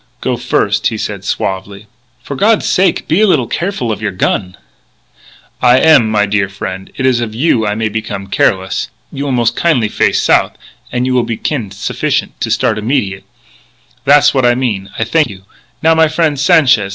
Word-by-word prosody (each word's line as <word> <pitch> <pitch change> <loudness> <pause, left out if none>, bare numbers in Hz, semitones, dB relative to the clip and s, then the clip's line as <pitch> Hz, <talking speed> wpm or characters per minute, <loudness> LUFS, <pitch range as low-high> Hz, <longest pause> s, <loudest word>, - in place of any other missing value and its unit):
"Go - - -1
first," - - 0
he - - -3
said - - -5
suavely. 100 +2 -4 0.4
"For 140 - -6
God's 210 +8 +2
sake, 190 +1 +1
be 165 +7 +2
a 215 - +5
little 185 - +2
careful 170 - -3
of 105 - -4
your 105 - -1
gun 90 0 -2 0.5
" - - -28
"I 125 - +6
am, 135 -5 +5
my 105 -1 +2
dear 105 -1 0
frien'. 95 -1 -6
It 130 - -1
is 130 -2 +2
of 110 -2 -4
you 120 -5 +1
I 105 - -1
may 110 0 -1
become 105 -2 -5
careless. 95 -1 0 0.2
You 140 +1 -4
will 140 - -2
mos' 120 -2 +2
kin'ly 120 -5 +1
face - - +1
south, - - +2 0.3
and 125 0 -1
you 130 - 0
will 125 - +3
be 115 -1 -4
kin' 120 -10 -3
sufficient 100 +1 -3
to - - -1
start 110 -1 0
immediate. 105 -4 -2 0.8
Tha's 145 +1 +5
what 130 -2 +1
I 120 0 +4
mean.... 105 -7 -2
I - - 0
thank 155 +7 +1
you.... 95 -2 -11 0.4
Now, 165 +1 +5
my 160 0 +4
frien', 155 -1 0
Sanchez! 130 -8 +3
120 Hz, 195 wpm, -14 LUFS, 105-145 Hz, 0.8 s, I